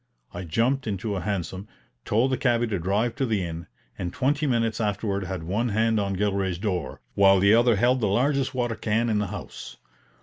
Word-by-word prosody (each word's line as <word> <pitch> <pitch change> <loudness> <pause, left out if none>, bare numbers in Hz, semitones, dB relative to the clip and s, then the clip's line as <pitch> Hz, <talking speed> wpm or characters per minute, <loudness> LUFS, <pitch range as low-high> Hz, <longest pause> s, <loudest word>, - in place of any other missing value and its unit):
I 90 +1 -6
jumped 120 - 0
into 100 0 -2
a 95 - -3
hansom, 95 +1 -4 0.4
told 120 +5 +2
the 130 - +1
cabby 120 -2 +2
to 105 -5 -2
drive 105 +7 0
to 135 - +1
the 105 -5 0
inn, 85 0 -7 0.3
and 90 -1 -3
twenty 145 - 0
minutes 115 -3 0
afterward 100 -2 -1
had 95 -3 -5
one 105 +8 -1
hand 110 +1 +1
on 100 -1 -1
Gilray's 95 -3 0
door, 90 -9 -3
while 100 -1 +5
the 100 +2 +5
other 120 0 +4
held 125 +5 +2
the 105 - +2
largest 135 +5 +1
water 120 -2 0
can 115 +1 0
in 105 - +1
the 105 - -1
house. 95 -1 -8
105 Hz, 200 wpm, -25 LUFS, 95-120 Hz, 0.4 s, while